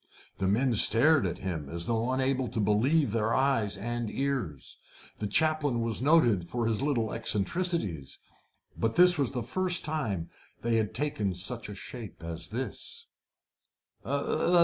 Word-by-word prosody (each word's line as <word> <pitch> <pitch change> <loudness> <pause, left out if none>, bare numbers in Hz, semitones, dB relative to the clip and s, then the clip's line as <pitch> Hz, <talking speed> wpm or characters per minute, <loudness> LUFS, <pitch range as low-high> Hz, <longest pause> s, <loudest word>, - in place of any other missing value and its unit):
The 95 - 0
men 120 +6 +2
stared 120 +8 +6
at - - -4
him 85 -7 -5
as 85 +2 -4
though 115 +1 -1
unable 130 0 0
to 115 - -4
believe 110 +7 +2
their 110 +1 0
eyes 125 -7 +1
and 120 +2 -3
ears. 130 - -3 0.4
The 105 - -2
chaplain 145 0 +1
was 115 0 -1
noted 130 - +4
for 115 +7 -3
his 115 0 0
little 125 -6 0
eccentricities, 110 - -1 0.6
but 115 0 -2
it 180 -2 +6
was 135 -2 0
the 125 -3 -3
first 180 +9 -1
time 110 - -3 0.3
they 115 -1 +1
had 110 -2 -1
taken 105 -11 -1
such 105 +5 -3
a 105 - -7
shape 110 -4 -10
as 85 0 -5
this. 115 +1 -4
115 Hz, 150 wpm, -29 LUFS, 100-135 Hz, 0.6 s, stared